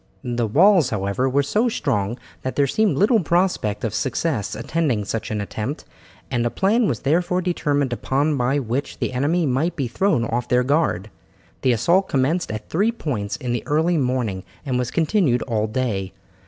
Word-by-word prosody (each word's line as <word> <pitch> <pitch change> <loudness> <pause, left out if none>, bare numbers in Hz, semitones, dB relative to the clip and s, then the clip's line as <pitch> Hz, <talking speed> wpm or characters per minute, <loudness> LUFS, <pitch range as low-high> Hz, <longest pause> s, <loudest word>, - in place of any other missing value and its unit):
The 120 -2 -1
walls, 175 - +5
however, 105 +5 -1
were 140 +2 +2
so 215 - +1
strong 120 - -1 0.2
that 130 - -4
there 140 - +3
seemed 190 +1 +1
little 220 - +4
prospect 170 - 0
of 110 -3 -1
success 130 - -1
attending 140 -11 -1
such 110 +2 -3
an 110 - -2
attempt, 105 +7 -4 0.5
and 120 -1 +1
a 120 - +1
plan 210 - +2
was 120 -7 -2
therefore 175 +5 +1
determined 145 -7 0
upon 140 +5 0
by 130 +2 +1
which 130 +1 -3
the - - -2
enemy 155 +7 +1
might 150 +6 0
be 140 -6 -1
thrown 125 - +1
off 120 +1 -2
their 125 0 +3
guard. 125 - 0 0.5
The 130 - +3
assault 180 - +2
commenced 145 +7 +1
at 110 0 -6
three 205 +8 +1
points 120 - -3
in 125 -1 -3
the 120 - -1
early 160 +3 +2
morning 125 -8 -1 0.2
and 130 -3 0
was 125 -1 -1
continued 155 - +1
all 110 -3 -1
day. 105 -5 -2
135 Hz, 180 wpm, -22 LUFS, 115-165 Hz, 0.5 s, walls